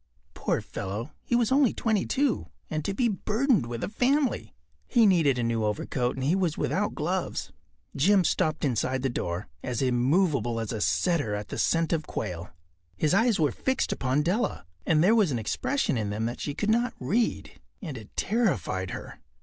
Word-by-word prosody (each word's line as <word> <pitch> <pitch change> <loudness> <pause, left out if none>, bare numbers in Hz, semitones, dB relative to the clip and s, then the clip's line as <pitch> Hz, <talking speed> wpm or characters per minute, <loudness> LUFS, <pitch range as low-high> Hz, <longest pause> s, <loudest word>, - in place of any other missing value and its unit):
Poor - - -1
fellow, 105 +7 -5
he 240 - -1
was 240 -1 +2
only 270 -3 +4
twenty 220 -4 0
two—and 240 - -2
to 200 - -1
be 235 +5 +1
burdened 215 - +1
with 120 -1 -5
a - - 0
family! 260 +5 0 0.3
He 235 -3 +4
needed 165 -9 +4
a 120 - 0
new 115 -1 0
overcoat 120 +4 -1
and 130 - -4
he 145 +6 +2
was 180 -5 0
without - - -1
gloves. - - -2 0.4
Jim 190 +7 +4
stopped 155 -2 0
inside 130 +1 0
the 135 - +1
door, 90 -4 -3
as 125 -2 -3
immovable 130 - +2
as 115 -2 -3
a 110 - -3
setter 105 - +1
at 105 0 -6
the - - -4
scent 165 0 +2
of 155 -2 -1
quail. 90 -4 -4 0.5
His 155 - +2
eyes 225 +1 +3
were 150 -4 +3
fixed 265 - -1
upon 135 +3 0
Della, 185 - -1 0.2
and 155 -1 +4
there 205 +5 +5
was 215 -6 +4
an 130 - -1
expression 130 - -1
in 105 -2 -2
them 105 +2 -2
that 120 +1 -4
she 145 - -3
could 210 +6 0
not 240 +2 +1
read, 215 - -1 0.2
and 160 -9 -6
it 110 -4 -9
terrified 110 - 0
her. - - -8
150 Hz, 185 wpm, -27 LUFS, -, 0.5 s, there